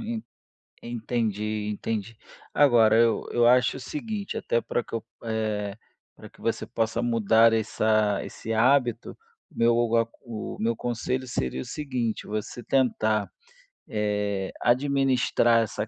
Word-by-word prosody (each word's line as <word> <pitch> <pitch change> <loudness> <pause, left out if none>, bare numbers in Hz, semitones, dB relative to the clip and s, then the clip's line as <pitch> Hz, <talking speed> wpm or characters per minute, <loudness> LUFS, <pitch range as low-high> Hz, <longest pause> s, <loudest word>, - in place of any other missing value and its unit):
en 230 -1 -4 0.6
entendi 110 -3 -2
entendi. 110 +1 -4 0.4
Agora, 120 -6 +5
eu 115 -1 +3
eu 120 0 +3
acho 125 +2 +4
o - - -8
seguinte, 200 - -5
até 115 - 0
para 120 - -2
que - - -16
eu, 115 - -3 0.2
eh, 110 -2 -2 0.4
para - - -12
que - - -21
você - - -1
possa 115 +1 -1
mudar 115 -1 +4
essa 110 -1 +1
esse 115 - -7
hábito, 120 0 +2 0.4
o - - -21
meu 115 0 +4
o 120 -1 +1
o 115 - +4
a 115 0 +2 0.2
o 115 -3 -6
meu 115 +1 0
conselho 125 +2 -3
seria 65 - -2
o - - -7
seguinte, 125 -7 -3
você 110 +3 -4
tentar, 110 -6 +1 0.6
eh, 105 -2 -1
administrar 125 -3 +3
essa 110 0 -4
115 Hz, 145 wpm, -26 LUFS, 110-125 Hz, 0.6 s, Agora